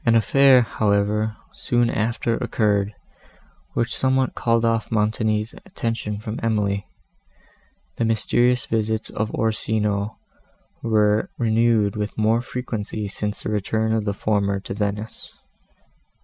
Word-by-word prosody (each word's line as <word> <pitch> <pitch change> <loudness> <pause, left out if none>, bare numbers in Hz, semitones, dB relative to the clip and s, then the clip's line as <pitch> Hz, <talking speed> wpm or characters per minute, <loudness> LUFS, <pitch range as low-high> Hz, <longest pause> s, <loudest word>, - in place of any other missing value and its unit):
An 115 -4 +4
affair, 130 +3 +6
however, 105 0 0 0.2
soon 120 -1 +1
after 115 +1 0
occurred, 105 -2 0 0.8
which 120 - 0
somewhat 130 -1 +1
called 115 0 +1
off 115 -1 0
Montoni's 110 0 0
attention 115 -3 -3
from 110 +1 -5
Emily. 105 -3 0 1.1
The - - +1
mysterious 120 +2 +2
visits 110 0 -1
of 110 0 -2
Orsino 110 -2 -1 0.6
were 105 -2 +2
renewed 115 -3 +2
with 105 0 -4
more 110 +2 +2
frequency 110 -4 -4
since 105 +1 -4
the - - -2
return 110 +2 0
of 110 -2 0
the 100 - 0
former 100 -1 0
to 95 - -6
Venice. 105 +1 -4
110 Hz, 120 wpm, -23 LUFS, 105-115 Hz, 1.1 s, affair